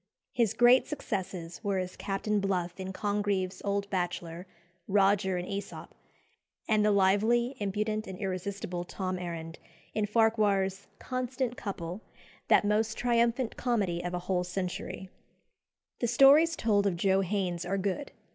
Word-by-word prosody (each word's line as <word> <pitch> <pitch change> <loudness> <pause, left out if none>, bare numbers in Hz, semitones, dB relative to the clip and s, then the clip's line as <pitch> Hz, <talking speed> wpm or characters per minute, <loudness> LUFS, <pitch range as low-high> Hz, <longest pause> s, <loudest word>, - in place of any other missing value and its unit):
His 230 -5 +1
great 245 +2 +6
successes 190 - -5
were 200 -2 0
as 185 -1 -3
Captain 205 +1 -1
Bluff 180 -2 -2
in 190 0 -4
Congreve's 200 -2 -1
"Old 200 0 -1
Bachelor," 175 -1 -3 0.4
Roger 195 -1 +3
in 175 - -3
"Æsop," 200 +1 -6 0.8
and 215 -1 +3
"the 210 - +4
lively, 215 +6 +3
impudent, 215 +2 -2
and 190 - -7
irresistible 185 -2 -4
Tom 185 +1 -4
Errand" 165 -2 -6 0.3
in 210 -1 0
Farquhar's 205 -3 +2
"Constant 255 -1 -3
Couple," 190 -3 -5 0.5
"that - - +5
most 215 +2 +1
triumphant 235 0 +1
comedy 200 -9 0
of 175 0 -3
a - - -2
whole 180 -1 +1
century." 185 +1 -5 0.9
The 240 - 0
stories 280 +7 +6
told 210 -8 +2
of 180 -3 -1
Joe 190 +2 +3
Haines 185 -3 -1
are 195 +3 -1
good. 200 +8 -2
200 Hz, 135 wpm, -30 LUFS, 185-220 Hz, 0.9 s, great